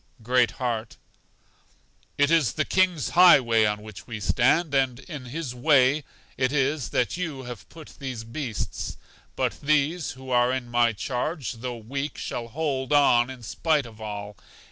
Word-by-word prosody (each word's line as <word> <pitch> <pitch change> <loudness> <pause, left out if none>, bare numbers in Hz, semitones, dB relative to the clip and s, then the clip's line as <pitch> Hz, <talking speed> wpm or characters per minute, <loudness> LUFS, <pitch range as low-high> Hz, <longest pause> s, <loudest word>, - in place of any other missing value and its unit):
Great 125 +1 +3
heart: 115 -3 -3 1.2
It 145 +2 +3
is 160 -7 +3
the 155 - 0
King's 185 -5 +1
high 175 -3 +8
way 115 -3 +2
on 105 0 -2
which 110 -3 -11
we 115 -3 -5
stand, 140 - +2
and 130 -3 +2
in 150 -7 -8
His 135 0 -5
way 135 +2 +3 0.3
it 130 0 +1
is 140 -4 0
that 125 - 0
you 155 -7 -4
have 120 -5 -9
put 160 -2 -13
these 130 -5 -5
beasts. 115 -1 -5 0.4
But - - -2
these, 150 +3 +1
who 130 0 -10
are 120 0 +3
in 130 -2 -3
my 120 -1 +3
charge, 130 - -3
though 120 +1 -6
weak, 135 +6 -5
shall 120 -1 -4
hold 135 0 -2
on 130 -4 +4
in 130 -2 -9
spite 150 +5 0
of 110 -2 -13
all. 105 -1 -6
130 Hz, 165 wpm, -25 LUFS, 120-150 Hz, 1.2 s, high